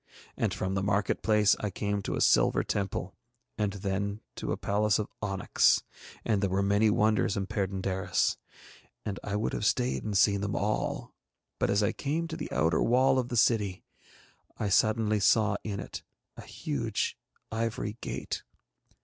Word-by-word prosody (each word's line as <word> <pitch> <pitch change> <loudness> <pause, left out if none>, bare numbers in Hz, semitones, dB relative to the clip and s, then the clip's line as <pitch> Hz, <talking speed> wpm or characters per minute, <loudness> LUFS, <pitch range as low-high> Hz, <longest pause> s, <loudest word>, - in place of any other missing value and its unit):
And - - 0
from 95 +1 -2
the 95 - 0
market 100 0 0
place 105 -1 +4
I 105 - -2
came 100 +1 -2
to - - -3
a - - -2
silver - - +4
temple 95 -2 -2 0.4
and 105 -2 -1
then 100 +1 -2 0.2
to - - -3
a - - -1
palace 105 +1 +1
of 105 - -2
onyx, 95 -2 +2 0.4
and 105 -4 +1
there 100 - +1
were 95 +2 +1
many 100 +2 +3
wonders 105 -1 +2
in 100 - -1
Perd├│ndaris, 95 -1 -1 0.7
and 100 -2 -3
I 105 - -3
would 105 +2 -1
have - - -2
stayed 125 +4 +1
and 105 -2 -1
seen 100 0 +4
them 100 -1 -2
all, 105 +2 -2 0.5
but - - +1
as 100 +1 +2
I 105 - +2
came 160 +4 -2
to 160 - -4
the - - -6
outer 80 +5 +2
wall 130 +2 +4
of 125 -1 -2
the 120 - -2
city 105 -5 +2 0.7
I 105 - -1
suddenly 110 +1 +3
saw 105 0 +3
in 100 -2 -4
it - - -6 0.3
a - - -9
huge - - -2 0.4
ivory 110 -1 -2
gate. - - -4
105 Hz, 170 wpm, -29 LUFS, 100-110 Hz, 0.7 s, place